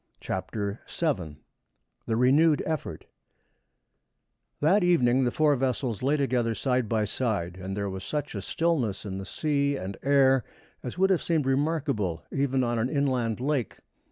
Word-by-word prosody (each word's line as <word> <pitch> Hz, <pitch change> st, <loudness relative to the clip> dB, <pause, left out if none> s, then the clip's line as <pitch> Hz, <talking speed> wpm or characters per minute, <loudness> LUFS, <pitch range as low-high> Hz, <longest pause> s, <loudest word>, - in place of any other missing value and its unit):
CHAPTER 100 Hz, +2 st, -4 dB
VII 90 Hz, -, -2 dB, 0.7 s
THE 115 Hz, -, +1 dB
RENEWED 145 Hz, +6 st, +4 dB
EFFORT 160 Hz, -3 st, -4 dB, 1.5 s
That 180 Hz, +7 st, +3 dB
evening 130 Hz, -7 st, +3 dB
the 120 Hz, -, +1 dB
four 150 Hz, +1 st, +3 dB
vessels 125 Hz, -3 st, -1 dB
lay 140 Hz, +4 st, +2 dB
together 125 Hz, -5 st, 0 dB
side 125 Hz, -3 st, 0 dB
by 110 Hz, -2 st, +1 dB
side, 105 Hz, -6 st, -2 dB
and 95 Hz, +2 st, -5 dB
there 100 Hz, 0 st, -1 dB
was 95 Hz, -1 st, -5 dB
such 150 Hz, -1 st, -3 dB
a -, -, -4 dB
stillness 140 Hz, -, -1 dB
in 95 Hz, -1 st, -4 dB
the 95 Hz, -, -6 dB
sea 140 Hz, 0 st, 0 dB
and 95 Hz, -2 st, -6 dB
air 135 Hz, -2 st, +4 dB, 0.4 s
as 125 Hz, +5 st, -6 dB
would 190 Hz, +1 st, +3 dB
have 185 Hz, -, +2 dB
seemed 160 Hz, -5 st, 0 dB
remarkable 135 Hz, -, 0 dB
even 135 Hz, -1 st, +1 dB
on 120 Hz, -1 st, 0 dB
an 120 Hz, +3 st, 0 dB
inland 130 Hz, -6 st, 0 dB
lake. 135 Hz, -3 st, -1 dB
130 Hz, 155 wpm, -27 LUFS, 110-145 Hz, 1.5 s, RENEWED